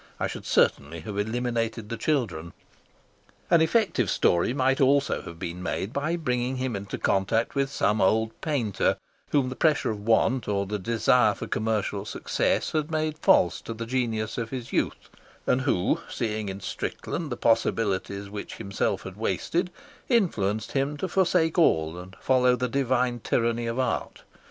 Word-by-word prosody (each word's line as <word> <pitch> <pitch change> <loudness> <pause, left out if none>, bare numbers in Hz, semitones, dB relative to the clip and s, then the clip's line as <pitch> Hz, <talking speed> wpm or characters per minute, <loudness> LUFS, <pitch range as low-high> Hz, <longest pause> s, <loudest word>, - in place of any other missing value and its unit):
I - - 0
should - - -6
certainly 80 +4 +2
have 100 +5 -5
eliminated 115 0 -2
the 115 - -2
children. 110 - -1 1.0
An 170 -2 +6
effective 160 - +2
story 85 +6 +2
might 130 0 +1
also 140 +1 +3
have 85 - -9
been 85 +2 -5
made 95 +4 -3
by 150 +5 0
bringing 125 -5 -1
him 130 -3 -2
into 100 0 -5
contact 100 +4 +1
with 140 -1 0
some 105 -6 +1
old 110 +3 +3
painter 125 - 0 0.3
whom 140 -3 +2
the 130 - -5
pressure 155 -6 +2
of 105 - -5
want 115 +1 +3
or 100 -1 0
the 105 +2 -3
desire 115 +4 +3
for - - -6
commercial 105 -2 -1
success 105 - -1
had 155 0 -1
made 155 -1 -1
false 90 - +4
to 115 - -6
the 115 +1 -5
genius 115 -3 -1
of 115 -1 -3
his 125 -3 -6
youth, - - -1 0.4
and 130 - +2
who, 130 -10 +1
seeing 110 -2 -2
in 95 +1 -6
Strickland 155 - -4
the 120 - -3
possibilities 100 -3 +1
which 100 +1 -7
himself 100 -3 -2
had - - -8
wasted, 180 +2 -1 0.4
influenced 110 - +1
him 140 +2 0
to 190 - -2
forsake 180 -3 +2
all 80 - +3
and 95 +1 -11
follow 125 -1 +3
the 125 +1 -1
divine 125 -2 +1
tyranny 115 +1 0
of 115 +1 -2
art. 130 -2 -2
115 Hz, 165 wpm, -26 LUFS, 105-135 Hz, 1.0 s, An